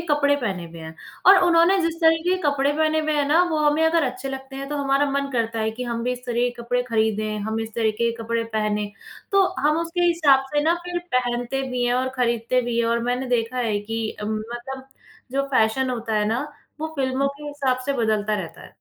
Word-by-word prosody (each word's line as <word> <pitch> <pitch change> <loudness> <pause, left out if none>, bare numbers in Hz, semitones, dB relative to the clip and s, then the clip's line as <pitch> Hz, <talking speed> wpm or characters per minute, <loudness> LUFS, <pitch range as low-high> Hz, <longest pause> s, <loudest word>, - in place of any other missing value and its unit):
कपड़े 285 -1 +3
पहने 195 -9 -3
हुए 165 0 -11
हैं। 160 0 -9 0.3
और 385 0 +9
उन्होंने 345 +3 +5
जिस 330 0 0
तरह 325 0 +6
के 370 - +3
कपड़े 285 -1 +2
पहने 315 +1 +1
हुए 310 0 -1
हैं 290 - +2
ना, 330 +4 +5
वो 315 - 0
हमें 305 +2 +2
अगर 325 0 +3
अच्छे 255 +1 -4
लगते 270 0 -7
हैं 275 0 -5
तो 295 - -3
हमारा 280 0 +1
मन 280 0 -1
करता 230 -1 -1
है 220 0 0
कि 240 +3 -6
हम 235 -1 -3
भी 250 - 0
इस 250 0 -8
तरह 240 - -2
के - - -4
कपड़े 245 +1 0
खरीदें, 215 -1 0
हम 220 +2 -2
इस 225 -1 -6
तरीके 230 +1 +1
के 230 0 -7
कपड़े 230 0 -1
पहने। 210 -1 -1 0.4
तो 395 -1 +5 0.2
हम 300 +3 +2
उसके 335 +1 -3
हिसाब 300 -6 +4
से 295 - +3
ना 330 +2 +3
फिर 355 0 -2 0.2
पहनते 245 +1 0
भी 250 -1 -1
हैं 245 0 +2
और 260 +1 0
खरीदते 235 0 +1
भी 235 -1 -2
हैं, 235 - +2
और 235 0 +1
मैंने 250 +2 -1
देखा 245 0 -1
है 220 -4 0
कि 225 +1 -3
अ, - - -3
मतलब 240 +5 -5 0.4
जो 275 0 +1
फ़ैशन 255 +1 +2
होता 230 -2 -3
है 210 -1 +2
ना, 240 +7 -1 0.3
वो 315 - -1
फिल्मों 265 +1 +1
के 295 - -10
हिसाब 275 -3 0
से 280 - +1
बदलता 215 -1 +1
रहता 165 - -9
है। - - -11
250 Hz, 235 wpm, -23 LUFS, 225-285 Hz, 0.4 s, और